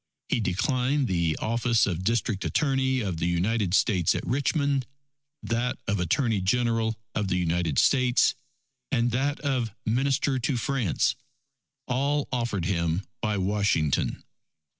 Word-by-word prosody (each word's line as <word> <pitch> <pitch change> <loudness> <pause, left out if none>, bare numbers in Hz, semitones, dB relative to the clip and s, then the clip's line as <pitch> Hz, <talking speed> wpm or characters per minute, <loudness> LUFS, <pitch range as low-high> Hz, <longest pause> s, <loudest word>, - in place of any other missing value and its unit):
He - - +1
declined 125 - 0
the 85 -4 0
office 115 0 +2
of 90 -2 -3
District 110 -1 0
Attorney 135 -3 +1
of 95 -6 -3
the 85 - -1
United 95 +2 +1
States 95 -8 +2
at - - -3
Richmond, 140 0 0 0.6
that 120 +2 -1
of 100 -1 0
Attorney 105 - +1
General 115 +2 +1 0.2
of 105 -2 -1
the 90 - 0
United 85 -4 0
States, 125 -2 +4 0.6
and 120 +1 +1
that 140 +5 0
of 125 -7 -1
Minister 135 +3 +1
to 130 +1 -1
France, 120 - 0 0.7
all 140 +3 0
offered 115 -8 -1
him 85 -1 0 0.2
by 105 -2 0
Washington. 95 -6 0
115 Hz, 130 wpm, -26 LUFS, 95-130 Hz, 0.7 s, States